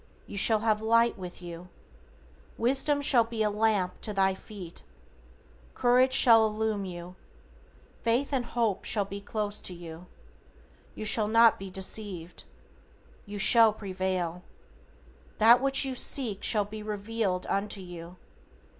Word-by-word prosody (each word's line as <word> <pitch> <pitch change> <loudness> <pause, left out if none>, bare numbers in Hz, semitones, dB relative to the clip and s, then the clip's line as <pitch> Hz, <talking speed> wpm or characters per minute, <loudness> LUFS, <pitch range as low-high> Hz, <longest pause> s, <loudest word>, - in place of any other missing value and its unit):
You - - -11
shall 215 +2 +3
have 215 -1 0
light 230 +1 +2
with 180 -2 -10
you. 175 +1 -10 0.9
Wisdom 275 +4 +3
shall 255 -4 +4
be 225 -1 -3
a 210 - 0
lamp 210 -3 -1
to 210 - -3
thy 195 -1 +1
feet. 190 -3 -10 0.9
Courage 250 +2 +3
shall 225 -4 +6
illumine 215 -1 -3
you. 175 +1 -10 0.9
Faith 245 +5 0
and 255 -3 -1
Hope 230 -5 -2
shall 205 -3 -1
be 200 +1 -8
close 210 0 -4
to 180 - -5
you. 170 0 -11 0.9
You 215 - -7
shall 215 0 +3
not 230 +1 +4
be 195 0 -8
deceived. 185 -2 -5 0.8
You 205 0 -7
shall 225 +2 +5
prevail. 185 -4 -4 1.0
That 235 +3 +6
which 270 0 +3
you 265 - -4
seek 245 -5 0
shall 210 -3 +2
be 215 +1 -9
revealed 210 -2 -3
unto 200 +1 -3
you. 175 -1 -10
210 Hz, 135 wpm, -27 LUFS, 190-230 Hz, 1.0 s, shall